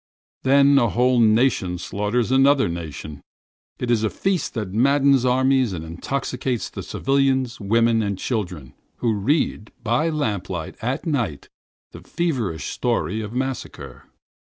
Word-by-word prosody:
Then 140 +1 +5
a 120 -3 +2
whole 125 +2 +2
nation 110 -5 +3
slaughters 105 +6 -1
another 135 +1 +4
nation. 80 -3 -6 0.6
It 120 - -2
is 110 -2 +2
a 110 - +2
feast - - -16
of - - -21
blood, - - -24
a - - -23
feast 190 -3 +1
that 105 -3 -4
maddens 140 0 +4
armies 130 -2 +2
and 80 -3 -5
that 80 - -8
intoxicates 125 +5 -3 0.2
civilians, 135 -2 0
women 115 +2 +2
and 100 -2 -2
children, 90 - -4 0.2
who 115 -2 0
read, 110 0 0
by 125 +8 +1
lamplight 100 - -3
at 125 +8 -2
night, 120 - -2 0.4
the - - -11
feverish 125 - -2
story 110 +5 -1
of 105 +1 -6
massacre. 125 - -5
120 Hz, 150 wpm, -22 LUFS, 100-135 Hz, 0.6 s, Then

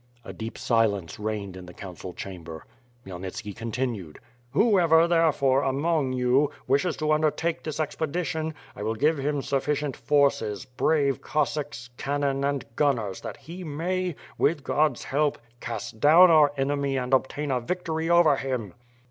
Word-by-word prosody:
A - - -7
dep 110 +1 -6
silence 105 -8 0
reigned 105 -3 -3
in 90 -1 -10
the 90 - -12
council 90 -2 -8
chamber. 85 -4 -8 0.4
Khmyelnitski 95 +3 -6
continued: 115 -7 -4 0.3
"Whoever, 170 - +4
therefore, 150 -6 +3
among 140 0 0
you, 130 +3 +3 0.2
wishes 145 +5 +1
to 155 0 0
undertake 155 +2 +1
this 155 -1 -5
expedition 160 +1 -2 0.2
I - - -8
will 110 +2 -1
give 150 +6 +2
him 145 0 -1
sufficient 140 0 -1
forces, 120 -6 +1
brave 140 +1 +1
Cossacks, 145 -5 -2
cannon 140 -1 -1
and 140 -1 -1
gunners 115 -10 0
that - - -7
he 175 +3 -9
may, 175 +3 -2 0.2
with 150 -2 +2
God's 150 -3 +1
help 145 +1 0 0.2
cast 115 -2 -6
down 165 +6 +7
our 150 -3 +6
enemy 140 0 0
and 125 0 -2
obtain 140 +2 +1
a 130 - +1
victory 165 +2 -2
over 170 -5 +5
him." 125 -9 -3
140 Hz, 145 wpm, -26 LUFS, 115-155 Hz, 0.4 s, down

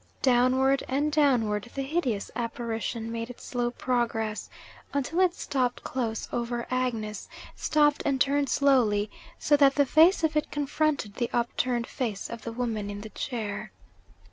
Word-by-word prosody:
Downward 260 +2 +3
and 285 +3 0
downward 240 -8 +2
the 275 - -1
hideous 265 -8 -1
apparition 230 -1 -3
made 230 0 -4
its 245 - -10
slow 245 -1 -1
progress, 230 -3 -1 0.5
until 285 +5 0
it 365 -1 +3
stopped 255 -6 -1
close 230 -4 -3
over 240 0 -2
Agnes 230 -5 -2 0.3
stopped, 295 -1 +2
and 275 -2 0
turned 280 0 +2
slowly, 220 -7 +3 0.3
so 295 - +3
that 275 -1 +5
the 285 - +4
face 325 +6 +5
of 315 -1 +1
it 300 - +1
confronted 290 -6 -1
the 240 - -1
upturned 240 0 0
face 225 -8 -4
of 235 -1 -6
the 230 - -5
woman 225 -4 -2
in 205 0 -6
the 220 - -8
chair. 215 -4 -4
245 Hz, 150 wpm, -27 LUFS, 225-280 Hz, 0.5 s, that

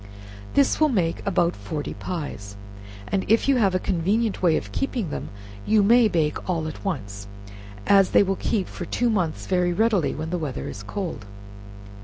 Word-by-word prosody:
This 280 -1 +3
will 310 -1 +4
make 175 -9 0
about 175 -3 +2
forty 125 +9 -5
pies, 105 - -6 0.5
and 195 -1 0
if 225 +4 +3
you 275 -2 +4
have 195 -5 +2
a - - +2
convenient 200 +5 0
way 170 -4 +4
of - - -6
keeping 240 - -2
them, - - -5 0.3
you 215 -1 +3
may 235 +3 +6
bake 160 -3 -1
all 165 -3 -1
at 155 - -8
once, 100 - -4 0.6
as 195 -1 +5
they - - +5
will 195 0 0
keep 195 0 -1
for 175 - -7
two 240 +6 0
months 175 -7 -1
very 180 -1 +1
readily 210 -5 +1
when 160 +1 -5
the 180 - -1
weather 145 -5 -4
is 105 - -7
cold. 115 - -5
180 Hz, 180 wpm, -24 LUFS, 155-210 Hz, 0.6 s, may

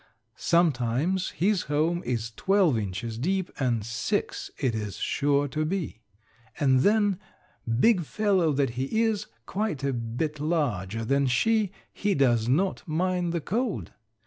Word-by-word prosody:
Sometimes 165 +2 +1
his 195 +1 +1
home 160 +4 +1
is 115 -2 -2
twelve 190 - +2
inches 110 +2 -3
deep, 185 +6 -1
and 120 -5 0
six 115 0 -2
it 125 - 0
is 105 -3 -4
sure 145 0 +1
to 155 +3 -1
be. 160 - -3 0.6
And 130 -3 +4
then, 205 +4 +3 0.6
big 220 - +5
fellow 190 -2 +1
that 135 -2 +1
he 135 - 0
is, 215 -2 0 0.2
quite 200 -9 -2
a 140 -1 0
bit 125 +6 -3
larger 115 - -1
than 140 +3 +2
she, 215 - +2 0.2
he 205 -1 0
does 120 -4 +2
not 185 +9 +1
mind 175 +2 0
the 170 -1 -1
cold. 225 - -2
150 Hz, 140 wpm, -27 LUFS, 125-190 Hz, 0.6 s, big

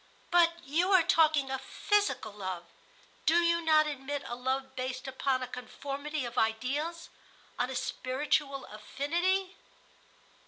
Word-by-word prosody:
"But 340 -1 +5
you 330 +7 +1
are 370 -3 +7
talking 310 -5 +3
of 265 0 -2
physical 410 - 0
love. 185 -4 -5 0.6
Do 320 - +5
you 340 0 +3
not 310 -1 +5
admit 285 -1 -4
a - - -5
love 265 +1 -2
based 255 +1 -4
upon 265 0 0
a - - -4
conformity 280 +3 -5
of 240 - -2
ideals, 280 +10 -1 0.5
on 245 +1 +1
a 265 - -4
spiritual 275 +2 -1
affinity?" 345 - -1
275 Hz, 130 wpm, -31 LUFS, 255-325 Hz, 0.6 s, are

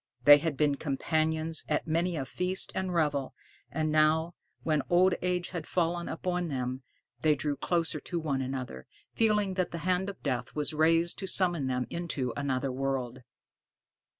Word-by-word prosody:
They 145 +2 +9
had 155 -2 -2
been 145 -1 +2
companions 160 +2 0
at 150 - 0
many 170 +2 0
a 135 -4 -2
feast 180 +6 0
and 190 -1 -2
revel; 150 -5 0 0.3
and 155 -1 -1
now, 155 +2 +3 0.3
when 155 -2 +2
old 180 +2 +5
age 180 -1 0
had 170 -4 -5
fallen 175 -1 0
upon 180 +1 -2
them, 130 -2 -3 0.4
they 155 +1 +4
drew 145 0 -2
closer 165 +2 -1
to 170 +4 -4
one 140 -4 -1
another, 130 - -5 0.3
feeling 210 -3 +2
that 185 -2 0
the 170 - -5
hand 185 +1 +1
of 195 - -10
death 125 -3 -2
was 150 0 -1
raised 165 +2 +2
to 195 - -4
summon 175 -7 +1
them 125 -1 -1
into 145 -8 -2
another 135 -1 -1
world. 130 -1 -2
155 Hz, 165 wpm, -30 LUFS, 140-175 Hz, 0.4 s, They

